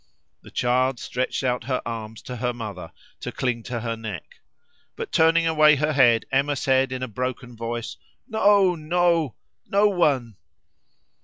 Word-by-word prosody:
The -, -, -14 dB
child 125 Hz, +1 st, +1 dB
stretched 130 Hz, +2 st, -3 dB
out 125 Hz, -2 st, -1 dB
her 130 Hz, 0 st, 0 dB
arms 110 Hz, -1 st, -6 dB
to 125 Hz, -, -7 dB
her 125 Hz, +1 st, -1 dB
mother 105 Hz, -8 st, -7 dB, 0.3 s
to -, -, -5 dB
cling 125 Hz, -3 st, -2 dB
to 120 Hz, -2 st, -4 dB
her 115 Hz, -1 st, -2 dB
neck. 110 Hz, -5 st, -8 dB, 0.6 s
But -, -, -6 dB
turning 165 Hz, +1 st, +4 dB
away 155 Hz, -2 st, +5 dB
her 150 Hz, +2 st, 0 dB
head, 120 Hz, -5 st, +4 dB
Emma 140 Hz, +2 st, +2 dB
said 135 Hz, -1 st, +1 dB
in 130 Hz, 0 st, -4 dB
a -, -, -2 dB
broken 125 Hz, +1 st, -5 dB
voice 115 Hz, +1 st, -5 dB, 0.3 s
"No, 205 Hz, -5 st, +4 dB
no! 170 Hz, -, +1 dB, 0.3 s
no 205 Hz, +1 st, +4 dB
one!" 135 Hz, -, +1 dB
130 Hz, 155 wpm, -24 LUFS, 115-155 Hz, 0.6 s, away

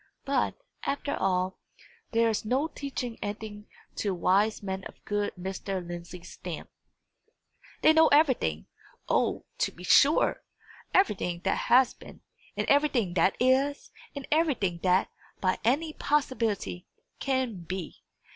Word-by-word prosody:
But, 280 Hz, -, +1 dB, 0.3 s
after 285 Hz, 0 st, -2 dB
all, 185 Hz, 0 st, 0 dB, 0.5 s
there 230 Hz, 0 st, +3 dB
is 220 Hz, -2 st, 0 dB
no 260 Hz, +8 st, +1 dB
teaching 260 Hz, -6 st, -5 dB
anything 210 Hz, 0 st, -6 dB, 0.3 s
to 200 Hz, -3 st, -1 dB
wise 200 Hz, +5 st, +2 dB
men 190 Hz, -1 st, -4 dB
of -, -, -9 dB
good 205 Hz, 0 st, -1 dB
Mr. 190 Hz, 0 st, -4 dB
Lindsey's 175 Hz, 0 st, -8 dB
stamp. -, -, -7 dB, 1.1 s
They 315 Hz, -, +7 dB
know 320 Hz, 0 st, +6 dB
everything 260 Hz, -, +3 dB, 0.4 s
O, -, -, +1 dB
to -, -, +1 dB
be 180 Hz, -, -13 dB
sure! 280 Hz, -, +4 dB, 0.5 s
everything 185 Hz, -, +1 dB
that -, -, -1 dB
has 250 Hz, +1 st, +6 dB
been, -, -, -14 dB, 0.4 s
and -, -, -1 dB
everything 280 Hz, -10 st, +2 dB
that 185 Hz, +2 st, +3 dB
is, 265 Hz, +3 st, +2 dB, 0.2 s
and 280 Hz, -, -6 dB
everything 265 Hz, -, +1 dB
that, 185 Hz, 0 st, +2 dB, 0.3 s
by 185 Hz, -1 st, +1 dB
any 285 Hz, +8 st, +2 dB
future -, -, -22 dB
possibility, 230 Hz, -10 st, -1 dB, 0.3 s
can 260 Hz, -6 st, -1 dB
be. 185 Hz, 0 st, -6 dB
220 Hz, 130 wpm, -28 LUFS, 185-275 Hz, 1.1 s, They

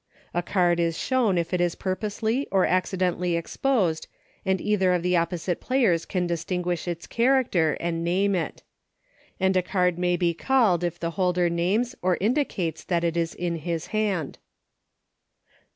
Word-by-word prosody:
A 175 Hz, -, +1 dB
card 175 Hz, -1 st, +1 dB
is 165 Hz, -1 st, 0 dB
shown 240 Hz, -8 st, +1 dB
if 170 Hz, +1 st, -2 dB
it 180 Hz, -, +1 dB
is 175 Hz, -1 st, +1 dB
pur 185 Hz, -1 st, -2 dB
posely, 220 Hz, +6 st, -2 dB
or 190 Hz, -2 st, +3 dB
accidentally 180 Hz, -1 st, 0 dB
exposed, 175 Hz, -1 st, 0 dB, 0.4 s
and 190 Hz, -1 st, +1 dB
either 190 Hz, -3 st, +2 dB
of 175 Hz, -1 st, 0 dB
the 180 Hz, 0 st, +2 dB
opposite 170 Hz, +1 st, -1 dB
players 230 Hz, -11 st, +2 dB
can 180 Hz, -2 st, -1 dB
distinguish 175 Hz, +1 st, -2 dB
its 170 Hz, -1 st, -4 dB
char 260 Hz, +3 st, +3 dB
acter, 165 Hz, -9 st, +1 dB
and 170 Hz, -1 st, -2 dB
name 190 Hz, +4 st, +1 dB
it. 175 Hz, -3 st, -3 dB, 0.8 s
And 190 Hz, 0 st, +2 dB
a 185 Hz, -, +4 dB
card 180 Hz, -1 st, 0 dB
may 180 Hz, 0 st, +1 dB
be 170 Hz, -1 st, +1 dB
called 210 Hz, -4 st, +2 dB
if 175 Hz, 0 st, -2 dB
the 170 Hz, 0 st, -2 dB
holder 180 Hz, -1 st, +1 dB
names 200 Hz, +9 st, 0 dB
or 180 Hz, -1 st, +1 dB
indicates 210 Hz, -, -1 dB
that 170 Hz, -2 st, 0 dB
it 170 Hz, -1 st, 0 dB
is 165 Hz, -1 st, -1 dB
in 170 Hz, -1 st, -2 dB
his 165 Hz, 0 st, -3 dB
hand. 200 Hz, -9 st, -1 dB
180 Hz, 170 wpm, -25 LUFS, 170-195 Hz, 0.8 s, a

